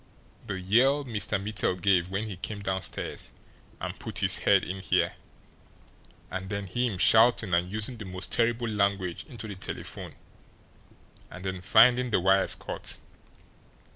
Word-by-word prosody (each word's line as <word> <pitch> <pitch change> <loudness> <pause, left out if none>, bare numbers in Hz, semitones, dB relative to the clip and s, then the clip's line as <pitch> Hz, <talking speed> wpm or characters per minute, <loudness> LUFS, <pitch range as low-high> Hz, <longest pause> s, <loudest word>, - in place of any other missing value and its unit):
"The 95 - -3
yell 130 +10 +3
Mr. 105 -4 -1
Mittel 100 -2 -1
gave 90 -1 +2
when 95 +3 -2
he 100 - -6
came 100 +3 -5
downstairs 95 -1 -3 0.5
and - - -6
put - - -7
his - - +4
head - - +4
in 95 +1 -5
here, - - +1 1.2
and 95 +1 -5
then 100 -1 -3
him 115 +2 -1
shouting 110 -2 +4
and 90 +1 +1
using 110 +4 -2
the 110 - -8
most 90 0 -6
terrible 120 0 +1
language 100 -4 -1
into 115 -4 -7
the 105 - -6
telephone, 95 - -6 1.1
and 95 +1 -10
then 95 -1 -3
finding 120 +6 +5
the 110 - +2
wires 95 +2 +4
cut. - - -1
100 Hz, 145 wpm, -28 LUFS, 95-115 Hz, 1.2 s, finding